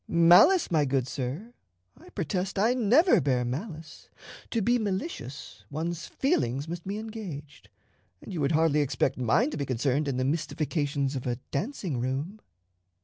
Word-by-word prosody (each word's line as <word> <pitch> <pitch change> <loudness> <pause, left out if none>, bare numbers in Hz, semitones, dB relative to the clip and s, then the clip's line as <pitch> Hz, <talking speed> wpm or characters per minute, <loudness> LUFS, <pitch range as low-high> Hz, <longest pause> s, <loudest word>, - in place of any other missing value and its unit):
"Malice, 175 - +6
my 155 -3 +3
good 135 -2 0
sir! 140 - -5 0.4
I - - -16
protest 185 +2 -3
I 220 +5 +3
never 255 - +4
bear 130 -3 +1
malice. 155 - -6 0.4
To 230 - 0
be 240 +4 +2
malicious, 190 - -5
one's 165 +3 -4
feelings 145 - 0
must 170 +1 -6
be 200 +2 -3
engaged; 200 -11 -8 0.5
and - - -9
you 165 - -2
would 140 +3 +1
hardly 155 -1 +3
expect 135 -2 0
mine 130 - +2
to - - -4
be 140 - -2
concerned 135 +4 0
in 135 -2 -1
the 130 - 0
mystifications 145 -2 -1
of 130 -1 -4
a 120 - 0 0.2
dancing 180 - -3
room." 140 - -3
160 Hz, 155 wpm, -28 LUFS, 140-200 Hz, 0.5 s, Malice